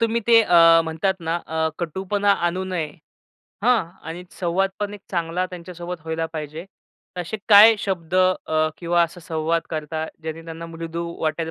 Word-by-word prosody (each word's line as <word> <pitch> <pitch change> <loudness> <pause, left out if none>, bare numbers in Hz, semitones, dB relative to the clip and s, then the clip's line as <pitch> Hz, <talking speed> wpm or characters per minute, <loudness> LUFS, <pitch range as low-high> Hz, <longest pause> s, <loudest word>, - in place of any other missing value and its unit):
तुम्ही 230 0 +1
ते 230 -1 +7
अ, 165 -3 +6
म्हणतात 160 +4 0
ना, 165 +1 -1
अ, 160 0 0
कटूपणा 195 +4 -1 0.2
आणू 185 +2 -3
नये. 180 -4 -2 0.8
हं. 225 -9 +3 0.2
आणि 175 +2 -6 0.2
संवाद 185 +2 +1
पण 205 0 -2
एक 205 - -11
चांगला 175 0 -1
त्यांच्यासोबत 175 -1 -8
व्हायला 160 0 -2
पाहिजे. 155 +1 -6 0.5
असे 180 +4 -4
काय 215 +2 +9
शब्द 185 -4 -3
अ, 180 -4 +2
किंवा 175 0 +2
असा 170 +1 -3
संवाद 165 0 -1
करता, 155 0 -3 0.2
ज्यांनी 160 +1 -5
त्यांना 165 0 -7
मृदू 165 0 -5 0.2
वाटेल, 160 +1 -1
170 Hz, 155 wpm, -22 LUFS, 160-185 Hz, 0.8 s, काय